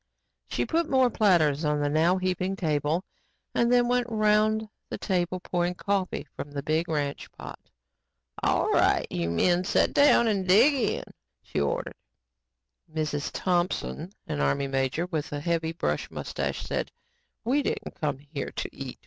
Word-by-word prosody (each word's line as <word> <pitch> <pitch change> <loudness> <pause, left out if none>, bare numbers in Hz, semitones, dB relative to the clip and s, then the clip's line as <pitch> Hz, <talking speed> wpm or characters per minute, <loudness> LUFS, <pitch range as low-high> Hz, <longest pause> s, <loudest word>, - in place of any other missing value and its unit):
She - - -1
put 330 0 0
more 260 -2 +4
platters 170 -9 +3
on 150 -1 +1
the 145 - +1
now 160 +5 +3
heaping 185 +1 -1
table 155 -1 0 0.5
and 235 0 +2
then 245 -1 +4
went 245 0 +1
around 215 0 +2 0.2
the - - -4
table 185 -2 -1
pouring 175 0 -1
coffee 195 -3 -1
from 145 - -6
the 140 -1 -5
big 155 +3 0
ranch 145 -3 -2
pot. - - -9 0.8
"All - - +2
right, - - +3
you 85 -1 -1
men 175 - +2
sit 185 - +2
down 285 -4 +6
now 225 - +3
and 195 -3 -1
dig 225 +11 +6
in," 260 -5 0 0.4
she - - -3
ordered. 70 - -1 1.0
"Mrs. 155 -2 -2
Thompson," 175 -1 -1
an 75 - -3
Army 70 - +1
major 135 +4 0
with 160 -5 -3
a 145 - -2
heavy 165 +1 -1
brush 165 - -2
mustache - - -3
said, - - -3 0.5
"we 270 +5 +2
didn't - - -3
come 145 -3 0
here 140 0 -6
to - - -4
eat. 135 -2 -7
175 Hz, 160 wpm, -27 LUFS, 150-210 Hz, 1.0 s, down